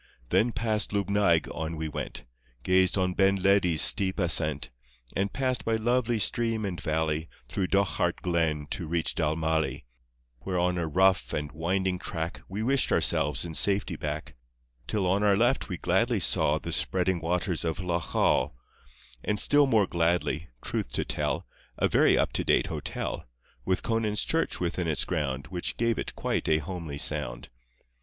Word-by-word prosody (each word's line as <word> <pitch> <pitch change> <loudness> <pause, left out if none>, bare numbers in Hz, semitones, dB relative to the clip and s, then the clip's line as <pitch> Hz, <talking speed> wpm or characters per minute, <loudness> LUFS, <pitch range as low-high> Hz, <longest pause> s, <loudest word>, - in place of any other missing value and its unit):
Then 120 +2 +2
past 110 -1 0
Lubnaig 100 -4 +2
on 80 +1 -4
we 80 0 -4
went, 75 - -5 0.4
Gazed 95 +3 +3
on 90 -1 +1
Ben 95 +1 +3
Ledi's 95 -4 +4
steep 95 -2 +5
ascent, 80 - +1 0.4
And 100 +1 0
passed 130 -3 -1
by 115 - 0
lovely 120 +1 +1
stream 115 +1 0
and 90 -5 -4
valley 80 0 -1 0.2
Through 95 -2 -1
Dochart 95 -3 0
Glen 80 -4 0
to 85 - -4
reach 85 +1 -1
Dalmally, 80 0 -1 0.6
Where 95 +4 -3
on 90 0 +1
a 80 - -1
rough 95 +4 +2
and 75 0 -3
winding 90 +3 -1
track 80 -2 -5
We 100 +3 -4
wished 135 +3 +2
ourselves - - +2
in 85 - -6
safety 100 0 +1
back; 75 -2 -5 0.5
Till 105 -3 0
on 95 +3 +1
our 100 -2 +3
left 120 +3 +1
we 90 - -3
gladly - - +1
saw 75 +1 +3
The 85 - -6
spreading 90 +1 +1
waters 90 +1 -1
of 80 -1 -2
Loch 85 -3 -3
Awe, 65 - +3 0.7
And 105 0 -1
still 145 -1 +5
more 110 -6 +3
gladly 85 -2 0
truth - - -3
to - - -1
tell - - -2 0.2
— - - -29
A - - +2
very - - +4
up - - 0
to - - 0
date - - +2
hotel, - - -4 0.4
With 95 -1 0
Conan's 110 -3 0
church 165 0 -1
within 90 0 -2
its 75 -3 +1
ground, 70 -3 -2
Which 90 -2 -3
gave 115 -1 0
it - - -5
quite - - -2
a 80 - +4
homely 80 -2 -6
sound. - - -1
90 Hz, 165 wpm, -27 LUFS, 80-100 Hz, 0.7 s, steep